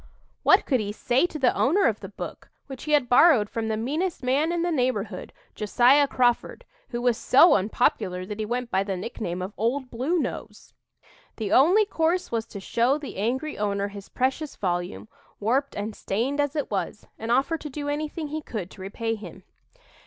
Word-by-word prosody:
What - - +5
could 260 -4 +2
he 205 -1 -3
say 245 +9 +1
to 320 - -7
the 260 -4 +2
owner 365 +9 +3
of 220 -2 +1
the 195 - -8
book, 200 - -8 0.2
which 270 0 -9
he 305 - 0
had 285 -4 +4
borrowed 245 -4 +5
from 225 -1 -2
the 220 -1 -1
meanest 305 +9 -2
man 280 +6 +1
in 345 -1 0
the 350 - 0
neighborhood, 235 - -1 0.2
Josiah 250 +7 +4
Crawford, 250 - 0 0.2
who 240 -1 -4
was 245 -2 +3
so 295 +5 +6
unpopular 190 -3 0
that 210 +2 -7
he 215 - -1
went 245 +1 -3
by 190 - +2
the 195 -2 -3
nickname 180 -3 -4
of 190 +2 -6
"Old 250 +4 -1
Blue 265 +10 0
Nose"? 320 - -5 0.6
The 215 -3 -4
only 365 +11 +5
course 345 -1 0
was 230 -1 -2
to 205 - -8
show 235 +7 +1
the 295 -8 -8
angry 260 +9 -2
owner 200 -1 -1
his 200 -1 -10
precious 270 +4 -1
volume, 175 - -3 0.3
warped 260 +7 0
and 205 +1 -4
stained 245 +9 -2
as 290 +1 0
it 295 -6 -2
was, 205 +1 -3
and 225 - -5
offer 270 +7 +2
to 300 - -7
do 290 +1 -5
anything 300 +1 -3
he 310 +1 -4
could 205 - -6
to - - -12
repay 225 +4 -3
him. 215 -1 -9
245 Hz, 195 wpm, -25 LUFS, 210-290 Hz, 0.6 s, so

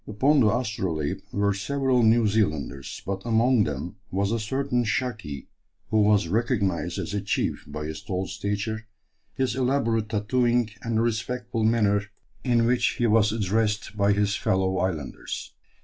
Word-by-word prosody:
Upon 135 +8 +3
the 115 - +5
Astrolabe 95 - -1
were 100 0 +1
several 130 +5 +1
New 115 0 +4
Zealanders, 80 -10 -1
but 95 0 -3
among 115 -1 +3
them 75 +5 -5
was 100 +2 0
a 115 - 0
certain 125 +2 0
"Shaki" 110 - -3 0.5
who 110 -1 +4
was 105 -3 +4
recognized 100 -5 0
as - - -4
a 105 - -1
chief 100 - -1
by 75 0 -5
his 80 +6 -5
tall 95 -3 -3
stature, 105 +3 -3 0.5
his 130 -2 0
elaborate 125 -5 +1
tattooing, 120 +2 +1
and 115 -1 -1
the - - +3
respectful 120 0 -2
manner 105 -2 +3 0.4
in 120 -3 +3
which 120 0 +2
he 120 - 0
was 105 -1 +4
addressed 105 0 0
by 100 -1 +3
his 105 0 +1
fellow 95 0 +1
islanders. 80 -8 -4
110 Hz, 150 wpm, -26 LUFS, 100-120 Hz, 0.5 s, the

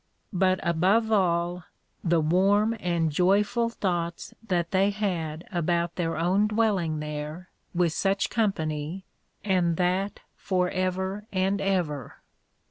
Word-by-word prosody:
But 185 0 +2
above 195 +7 +2
all, 175 -3 +1 0.4
the 170 -1 +3
warm 200 +7 +3
and 170 -4 0
joyful 205 +8 +2
thoughts 175 -6 -3
that 175 -6 -1
they 195 +1 +3
had 175 -6 -3
about 170 -1 0
their 165 -3 -1
own 185 +6 +2
dwelling 200 -8 +1
there, 150 +4 -6 0.3
with 170 -2 +2
such 195 +2 0
company, 165 -5 -1 0.4
and 180 -4 +1
that 185 +3 0
for 180 -2 0
ever 190 +3 -2
and 195 +1 0
ever. 170 -9 -1
180 Hz, 120 wpm, -27 LUFS, 170-195 Hz, 0.4 s, the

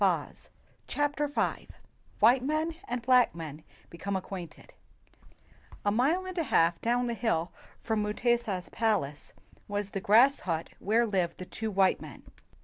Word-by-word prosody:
88 - - 0 0.4
CHAPTER 290 0 0
V 290 - -1 0.5
WHITE 245 +4 +6
MEN" 310 +4 0
AND 245 -1 -3
BLACK 250 -5 +4
MEN 155 -2 -7 0.3
BECOME 195 +4 -4
ACQUAINTED 185 -2 -7 1.1
A 205 - +3
MILE 290 - +2
and 370 -1 -7
a 325 - 0
half 165 -7 +2
down 245 +1 +1
the 235 - -1
hill 185 -8 -1 0.3
from 220 -2 0
Mutesa's 210 -3 0
palace 205 -11 -1 0.3
was 205 -1 -3
the 195 - -3
grass 240 +8 +5
hut 165 -3 -3
where 225 +4 +2
lived 185 -6 -1
the 185 - -7
two 220 +4 -4
white 195 -2 +2
men. - - -10
220 Hz, 145 wpm, -29 LUFS, 185-245 Hz, 1.1 s, WHITE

